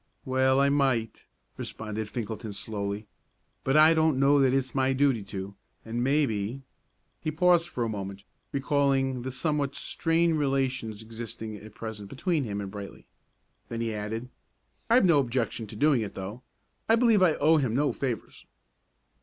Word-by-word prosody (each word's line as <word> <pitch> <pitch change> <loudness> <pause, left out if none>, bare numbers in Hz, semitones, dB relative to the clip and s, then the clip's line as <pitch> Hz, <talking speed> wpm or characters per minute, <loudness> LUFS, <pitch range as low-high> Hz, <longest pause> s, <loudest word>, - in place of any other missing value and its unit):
"Well, 130 0 +3
I 140 0 +4
might," 130 -6 0 0.3
responded 110 -1 -5
Finkelton, 110 -1 -5
slowly; 100 0 -3 0.6
"but 135 +3 +2
I 155 +1 +8
don't 160 -4 +2
know 140 +1 +5
that 135 -2 +4
it's 130 -1 0
my 135 -1 +2
duty 135 -4 +2
to, 100 0 -6 0.3
and 115 +2 -2
maybe 130 -3 0 0.3
" - - -46
He 155 - 0
paused 175 +2 +3
for 125 - -2
a - - 0
moment, 100 -2 -5 0.3
recalling 135 -2 +1
the 130 - -4
somewhat 140 0 -1
strained 165 +2 +1
relations 130 -6 -1
existing 110 -1 -6
at 105 +1 -13
present 110 -3 -7
between 155 - -1
him 100 -2 -3
and 100 -1 -6
Brightly; 100 -1 -9 0.6
then 115 - -4
he 115 -1 -1
added: 110 +4 -4 0.6
"I've 235 -2 +6
no 170 -5 +5
objection 120 -3 -1
to 105 - -9
doing 140 +1 +3
it, 105 - -5
though. 100 +6 -6 0.5
I 225 - +7
believe 230 -4 +4
I 175 -4 +5
owe 160 +3 +4
him 130 -6 0
no 145 +2 +2
favors." 125 -5 -5
130 Hz, 160 wpm, -28 LUFS, 110-145 Hz, 0.6 s, I